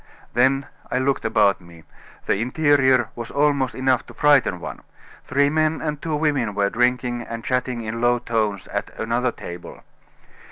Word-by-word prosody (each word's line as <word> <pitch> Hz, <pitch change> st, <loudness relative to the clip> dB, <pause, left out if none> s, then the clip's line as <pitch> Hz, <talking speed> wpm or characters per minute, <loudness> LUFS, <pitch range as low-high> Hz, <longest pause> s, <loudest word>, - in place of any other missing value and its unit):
Then 135 Hz, +3 st, +3 dB, 0.2 s
I -, -, -1 dB
looked 135 Hz, +1 st, 0 dB
about 100 Hz, -2 st, +3 dB
me. 85 Hz, -2 st, -15 dB, 0.4 s
The -, -, +2 dB
interior 130 Hz, +2 st, +3 dB
was 115 Hz, -1 st, -6 dB
almost 140 Hz, -2 st, +1 dB
enough 130 Hz, -1 st, +1 dB
to -, -, -13 dB
frighten 145 Hz, -11 st, +3 dB
one. -, -, -7 dB, 0.4 s
Three 140 Hz, +2 st, +2 dB
men 155 Hz, +1 st, +1 dB
and 150 Hz, -2 st, -3 dB
two 160 Hz, -2 st, -2 dB
women 145 Hz, -9 st, 0 dB
were 100 Hz, -1 st, +1 dB
drinking 125 Hz, 0 st, +1 dB
and 115 Hz, 0 st, -7 dB
chatting 125 Hz, -1 st, -1 dB
in 115 Hz, +1 st, -4 dB
low 120 Hz, 0 st, +3 dB
tones 110 Hz, -5 st, -1 dB
at -, -, -3 dB
another 120 Hz, +2 st, 0 dB
table. 85 Hz, -5 st, -9 dB
125 Hz, 160 wpm, -22 LUFS, 115-140 Hz, 0.4 s, Then